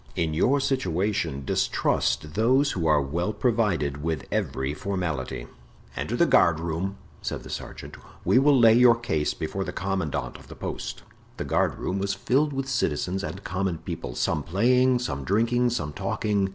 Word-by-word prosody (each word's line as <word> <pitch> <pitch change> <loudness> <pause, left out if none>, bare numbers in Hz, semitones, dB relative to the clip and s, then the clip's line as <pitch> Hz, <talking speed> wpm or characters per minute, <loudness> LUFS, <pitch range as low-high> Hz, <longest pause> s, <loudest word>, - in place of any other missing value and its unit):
In 80 -2 0
your 130 - +3
situation 95 - -1
distrust 75 +4 0
those 130 - +3
who 85 -4 -1
are 75 -1 +5
well 85 +8 -1
provided 105 - 0
with 80 -2 -2
every 65 +1 -1
formality." 75 -9 -3 0.5
"Enter - - -2
the - - +4
guardroom," 85 +4 +2 0.2
said - - -4
the - - -9
sergeant; - - -7 0.3
"we 125 - +5
will 140 0 +5
lay 115 -2 +7
your 120 0 +7
case 80 -11 -1
before 90 +4 -3
the - - -4
commandant 95 -5 -2
of - - -16
the - - -10
post." - - -5 0.3
The - - -3
guardroom 95 - 0
was 100 +1 -1
filled 135 +9 +1
with 135 -1 -3
citizens 95 - -1
and 95 -1 -6
common 95 -1 -2
people, - - -6
some 80 -2 0
playing, 125 - +3
some 70 - -3
drinking, 115 - +2
some 75 -11 -3
talking. 100 +2 0
95 Hz, 160 wpm, -26 LUFS, 80-120 Hz, 0.5 s, lay